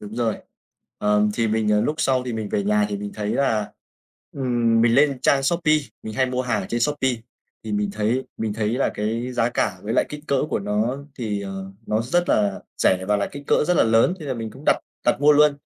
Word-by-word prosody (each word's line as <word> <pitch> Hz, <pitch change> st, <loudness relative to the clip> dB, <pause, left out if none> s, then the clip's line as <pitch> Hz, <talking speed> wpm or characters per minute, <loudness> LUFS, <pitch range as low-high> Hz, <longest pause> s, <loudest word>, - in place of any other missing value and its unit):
Đúng 105 Hz, +1 st, -9 dB
rồi. 115 Hz, -3 st, 0 dB, 0.6 s
Ờm, 105 Hz, 0 st, +2 dB
thì 115 Hz, -1 st, +1 dB
mình, 110 Hz, 0 st, 0 dB
ờ, 105 Hz, 0 st, +3 dB
lúc 150 Hz, -, 0 dB
sau 130 Hz, -1 st, +2 dB
thì 125 Hz, -, -4 dB
mình 110 Hz, -2 st, -3 dB
về 100 Hz, -, 0 dB
nhà 105 Hz, 0 st, +2 dB
thì 100 Hz, -, -3 dB
mình 100 Hz, 0 st, -6 dB
thấy 105 Hz, -1 st, -3 dB
là 110 Hz, -7 st, 0 dB, 0.6 s
ừm, 120 Hz, -4 st, +1 dB
mình 115 Hz, 0 st, +4 dB
lên 140 Hz, 0 st, +4 dB
trang 135 Hz, 0 st, +3 dB
Shopee, 155 Hz, +1 st, +2 dB, 0.3 s
mình 110 Hz, -, -6 dB
hay 130 Hz, -1 st, +2 dB
mua 125 Hz, 0 st, -1 dB
hàng 120 Hz, -3 st, 0 dB
ở -, -, -6 dB
trên 120 Hz, -, -2 dB
Shopee, 140 Hz, 0 st, +1 dB, 0.5 s
thì 110 Hz, -, -4 dB
mình 105 Hz, -1 st, 0 dB
thấy 110 Hz, +5 st, 0 dB
mình 110 Hz, -2 st, -2 dB
thấy 105 Hz, -1 st, -1 dB
là 125 Hz, -, +1 dB
cái 115 Hz, +4 st, -2 dB
giá 120 Hz, -1 st, +1 dB
cả 95 Hz, -5 st, -1 dB
với 110 Hz, -, -3 dB
lại -, -, +3 dB
kích 150 Hz, 0 st, -8 dB
cỡ 140 Hz, -, +2 dB
của -, -, 0 dB
nó 105 Hz, +6 st, -1 dB, 0.2 s
thì, 105 Hz, -4 st, -2 dB
ờ, 95 Hz, 0 st, -6 dB, 0.2 s
nó 110 Hz, +1 st, +1 dB
rất 175 Hz, +9 st, 0 dB
là 100 Hz, -2 st, +1 dB, 0.2 s
rẻ 95 Hz, 0 st, +2 dB
và 105 Hz, -, +3 dB
là 100 Hz, -, -1 dB
kích 145 Hz, 0 st, -8 dB
cỡ -, -, +3 dB
rất 180 Hz, -, +3 dB
là -, -, +5 dB
lớn 115 Hz, +10 st, +3 dB
thế 150 Hz, -, -7 dB
là 130 Hz, -, -2 dB
mình 115 Hz, -1 st, -5 dB
cũng 135 Hz, +6 st, -13 dB
đặt -, -, +5 dB, 0.3 s
đặt -, -, +2 dB
mua 150 Hz, +1 st, +6 dB
luôn. 150 Hz, 0 st, +5 dB
115 Hz, 245 wpm, -23 LUFS, 105-130 Hz, 0.6 s, mua